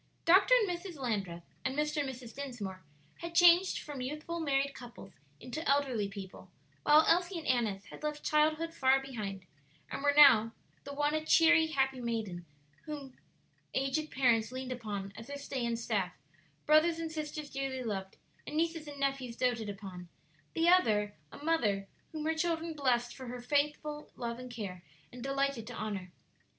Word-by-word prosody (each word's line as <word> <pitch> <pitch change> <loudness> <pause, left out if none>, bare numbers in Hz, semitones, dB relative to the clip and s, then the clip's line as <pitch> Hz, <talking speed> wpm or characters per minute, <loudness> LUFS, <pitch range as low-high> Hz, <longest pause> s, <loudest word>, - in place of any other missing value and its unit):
Dr. 390 +8 +7
and 460 -4 +3
Mrs. 350 -1 -5
Landreth 200 -10 -3 0.2
and 260 +2 -2
Mr. 300 +1 0
and 285 -2 0
Mrs. 250 -3 -9
Dinsmore 235 -9 -6 0.4
had 340 0 -7
changed 350 +2 +6
from 290 -3 -6
youthful 305 +6 -4
married 280 -3 +1
couples 235 -6 -11 0.3
into 255 - -5
elderly 265 -7 +2
people, 195 -2 -9 0.3
while 300 +1 +6
Elsie 350 +2 +2
and 325 - -6
Annis 215 -6 0
had - - -12
left 300 -1 -3
childhood 310 +2 +2
far 265 -3 +4
behind, 210 -8 -6 0.5
and - - -4
were 285 0 +3
now 225 -6 +8 0.3
the 280 - -6
one 295 +1 +1
a 310 0 0
cheery, 325 0 +5
happy 270 -4 0
maiden 225 -6 -2
lady, 175 -1 -12 0.4
whom 285 -4 -7 0.6
aged 275 +3 0
parents 235 -4 +2
leaned 255 0 -5
upon 205 -5 -5
as 225 +2 -9
their 285 0 -5
stay 270 -2 -4
and 235 -1 0
staff, 205 -6 -1 0.5
brothers 310 +2 +5
and 330 -1 -4
sisters 305 -1 -5
dearly 270 -1 -3
loved, 195 -4 -4 0.3
and 300 - -4
nieces 325 -1 0
and 285 -1 -8
nephews 270 -4 -1
doated 240 -4 0
upon; 190 -3 -8 0.5
the 330 +1 +2
other 215 - +4 0.2
a - - -10
mother 210 -12 +1 0.2
whom 310 -1 -5
her 320 - +2
children 330 0 -1
blessed 245 -5 +1
for 260 -2 -8
her 245 +1 -6
faithful 295 +3 -1
love 235 -1 -4
and 250 0 -8
care, 200 -7 -6 0.3
and 250 - -10
delighted 275 -4 -1
to 245 - -7
honor. 200 -5 -4
270 Hz, 170 wpm, -32 LUFS, 225-305 Hz, 0.6 s, now